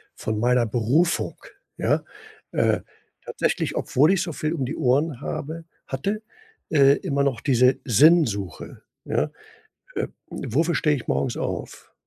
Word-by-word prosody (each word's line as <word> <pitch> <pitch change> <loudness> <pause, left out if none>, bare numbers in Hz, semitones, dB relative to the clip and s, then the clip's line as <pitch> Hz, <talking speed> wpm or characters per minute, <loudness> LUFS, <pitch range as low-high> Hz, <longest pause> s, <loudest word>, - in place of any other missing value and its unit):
von 110 -1 -3
meiner 125 +1 +3
Berufung, 125 +10 +1 0.4
ja? - - +1 0.5
Äh, - - +2 0.4
tatsächlich, - - -1
obwohl 150 +7 +3
ich 195 - +2
so 170 - -3
viel 155 +2 -2
um 140 -6 -2
die 140 - -4
Ohren 135 +2 +1
habe 160 +3 -5 0.2
hatte, 200 +11 -2 0.5
äh, 140 -2 +6
immer 140 0 -1
noch 130 -5 0
diese 125 -1 +3
Sinnsuche, 120 - +3 0.2
ja? - - 0 0.6
„Äh, - - -2 0.2
wofür 160 +8 0
stehe 150 -2 +2
ich 125 - -8
morgens 70 +1 0
auf?“ - - -5
140 Hz, 135 wpm, -24 LUFS, 120-160 Hz, 0.6 s, äh